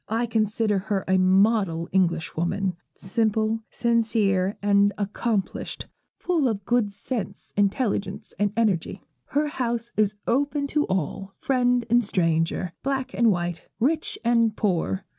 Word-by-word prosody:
I 225 +2 +1
consider 215 -2 +1
her 195 -2 0
a 190 0 +3
model 190 -3 +3
Englishwoman 180 +1 0 0.2
simple, 220 +2 0
sincere, 215 -5 +1
and 200 0 +3
accomplished; 205 0 -2 0.3
full 330 -7 +1
of 205 -4 -2
good 240 -4 +1
sense, 200 -1 -5
intelligence, 205 -1 -1
and 205 -1 +2
energy. 205 -8 0 0.2
Her 295 +1 0
house 235 -4 -2
is 210 -1 +2
open 285 +3 +1
to 300 0 +2
all, 190 +2 -3
friend 245 -2 +1
and 240 +1 +4
stranger, 165 -2 0
black 270 -1 -2
and 235 -1 +3
white, 175 -3 -2
rich 305 +7 0
and 230 -2 +3
poor. 165 - 0
210 Hz, 125 wpm, -25 LUFS, 190-235 Hz, 0.3 s, and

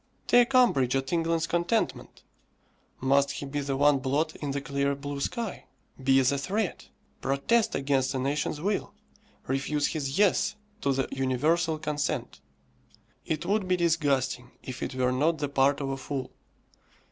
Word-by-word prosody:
Take 245 +2 +4
umbrage 135 - +4
at 135 +2 -1
England's 165 -1 +1
contentment! 175 +6 -1 0.8
Must 140 +1 +3
he - - -5
be 145 +1 -3
the 140 -1 -2
one 145 0 +4
blot 145 +5 0
in 145 - -4
the 140 +1 -1
clear 140 0 -1
blue 140 0 -5
sky! 225 - -3 0.4
Be 135 0 +4
as 130 0 +3
a 140 - 0
threat! 200 +6 -2 0.3
Protest 215 +12 +1
against 135 -1 0
a - - +1
nation's 140 +3 -1
will! 200 +5 -2 0.5
refuse 140 +2 0
his 140 -2 -2
Yes 210 +1 +3 0.3
to 140 - +1
the 135 0 0
universal 155 +6 +1
consent! 150 -1 -3 0.9
It 160 +1 -2
would 200 +1 0
be 185 0 +2
disgusting, 140 -7 +1
if 130 -1 -7
it - - -4
were 125 -1 +1
not 155 +6 +2
the 145 -1 -2
part 140 0 +3
of 135 - -2
a 135 - -2
fool. 135 0 -5
145 Hz, 160 wpm, -28 LUFS, 135-165 Hz, 0.9 s, Take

